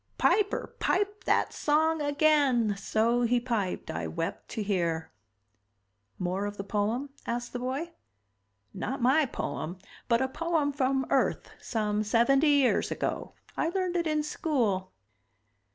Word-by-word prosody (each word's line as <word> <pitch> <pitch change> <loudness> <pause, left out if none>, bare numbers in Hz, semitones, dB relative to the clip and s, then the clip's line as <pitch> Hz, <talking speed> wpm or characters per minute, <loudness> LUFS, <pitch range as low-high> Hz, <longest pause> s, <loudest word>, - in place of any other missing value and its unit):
"Piper, 410 -1 +1
pipe 405 +1 0
that - - +2
song 315 +1 +2
again! 285 -7 +3
So 225 +4 +1
he 245 +1 +3
piped, 230 -6 -2
I 80 0 -3
wept 80 - -4
to 220 - -3
hear." 170 -5 -1 1.1
"More 185 +3 -1
of 205 0 -7
the 195 - -4
poem?" 220 +7 -1 0.2
asked 240 0 -3
the 245 - -3
boy. 270 +7 -3 0.8
"Not 270 +2 -3
my 270 +4 +4
poem 175 -6 -4 0.3
but 235 -1 +4
a 265 - +1
poem 315 0 0
from 265 -1 +1
Earth 270 - +1
some 210 -2 -1
seventy 240 +7 +3
years 280 -3 +3
ago. - - -3 0.2
I 325 - 0
learned 365 0 -1
it 340 -2 +1
in 305 -1 +1
school." 235 - -1
250 Hz, 135 wpm, -29 LUFS, 210-300 Hz, 1.1 s, my